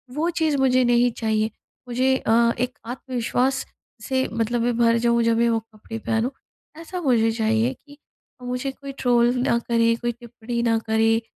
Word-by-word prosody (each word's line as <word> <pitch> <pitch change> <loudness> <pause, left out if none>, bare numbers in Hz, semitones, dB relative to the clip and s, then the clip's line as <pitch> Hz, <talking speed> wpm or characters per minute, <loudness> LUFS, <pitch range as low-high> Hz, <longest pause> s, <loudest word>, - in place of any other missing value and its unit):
वो 320 +3 0
चीज़ 320 -4 0
मुझे 255 -1 +3
नहीं 240 0 +3
चाहिए। 220 -1 0 0.4
मुझे 255 +2 +2
अ, 235 -1 +3
एक 250 +1 -2
आत्मविश्वास 255 +1 -1 0.4
से 260 0 0
मतलब 230 +1 0
मैं 240 0 0
भर 230 -1 +4
जाऊँ 235 0 +2
जब 230 0 +2
मैं 235 0 +3
वो 225 -1 +1
कपड़े 225 0 -10
पहनूँ। 225 +3 0 0.5
ऐसा 360 +2 -6
मुझे 235 -7 +3
चाहिए 225 +2 +1
कि 285 0 -15 0.5
मुझे 250 +2 -3
कोई 275 +1 -9
ट्रोल 240 -1 +3
ना 235 - +3
करे, 230 -1 +2
कोई 240 +1 -2
टिप्पणी 235 0 -6
ना 230 -1 +2
करे 225 +1 +2
235 Hz, 170 wpm, -23 LUFS, 230-255 Hz, 0.5 s, भर